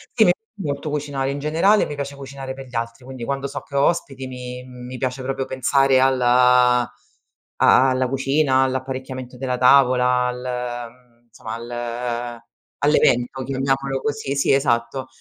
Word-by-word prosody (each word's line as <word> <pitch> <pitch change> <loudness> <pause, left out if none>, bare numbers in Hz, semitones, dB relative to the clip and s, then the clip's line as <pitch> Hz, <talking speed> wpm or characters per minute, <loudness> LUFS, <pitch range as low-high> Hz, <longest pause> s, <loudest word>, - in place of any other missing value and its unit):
Sì 220 -6 +5 0.3
molto 145 -4 -3
cucinare, 145 -2 -2
in 140 - -3
generale 165 +8 +3
e - - 0
mi 150 - -6
piace 140 0 -5
cucinare 135 -1 -7
per 135 0 -9
gli 125 -1 -14
altri, 115 +2 -4
quindi 130 -2 -8
quando 140 +1 -3
so 140 +1 -5
che 140 - -12
ho 140 - +4
ospiti 135 -6 -1
mi 125 -1 -7
mi 125 0 -9
piace 130 +1 -3
proprio 135 0 -3
pensare 135 0 +2
al 130 0 +3
a 125 0 +5 0.8
a 130 +1 +5
alla 130 0 +1
cucina, 135 +1 +2
all'apparecchiamento 130 -1 -4
della 125 -1 -2
tavola, 125 -1 +4
al 125 -1 -4
mhmm, 120 -1 -27
somma 110 0 -8
al 120 0 -4 0.4
all'evento, 130 -3 +2
chiamiamolo 135 0 -1
così. 145 -1 -2
Sì, 140 - +2
esatto. 130 -1 0
130 Hz, 160 wpm, -21 LUFS, 125-135 Hz, 0.8 s, Sì